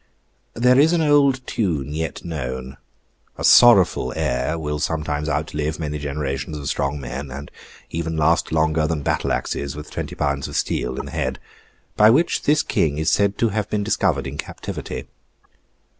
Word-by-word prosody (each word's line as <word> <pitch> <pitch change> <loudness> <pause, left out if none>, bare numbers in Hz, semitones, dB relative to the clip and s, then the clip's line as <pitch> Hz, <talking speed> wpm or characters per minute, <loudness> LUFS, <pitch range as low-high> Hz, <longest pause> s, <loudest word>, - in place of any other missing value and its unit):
There 125 +2 +4
is 160 +4 +5
an 170 - +2
old 140 -4 +3
tune 75 - -2
yet 80 +2 -4
known—a 65 -5 -8
sorrowful 95 - +6
air 65 +6 -1
will 75 -2 -3
sometimes 75 0 -2
outlive 75 +1 -2
many 75 -2 -4
generations 70 0 -3
of 70 -2 -6
strong 70 +1 -1
men, 70 +1 -6
and 70 +2 -8 0.4
even 80 -1 -3
last 80 +2 +2
longer 80 0 +2
than 75 -3 -2
battle - - 0
axes 70 0 -2
with 75 0 -9
twenty - - -5
pounds 70 -2 -1
of - - -8
steel 65 - -1
in - - -5
the - - -8
head—by 65 - -1
which 150 +9 +3
this 150 +1 +2
King 75 -3 0
is 80 +1 +1
said 100 0 +2
to 115 - +2
have 105 0 -2
been 105 -1 -1
discovered 95 -10 +1
in 65 - -5
his - - +2
captivity. - - -7
75 Hz, 165 wpm, -22 LUFS, 70-100 Hz, 0.4 s, sorrowful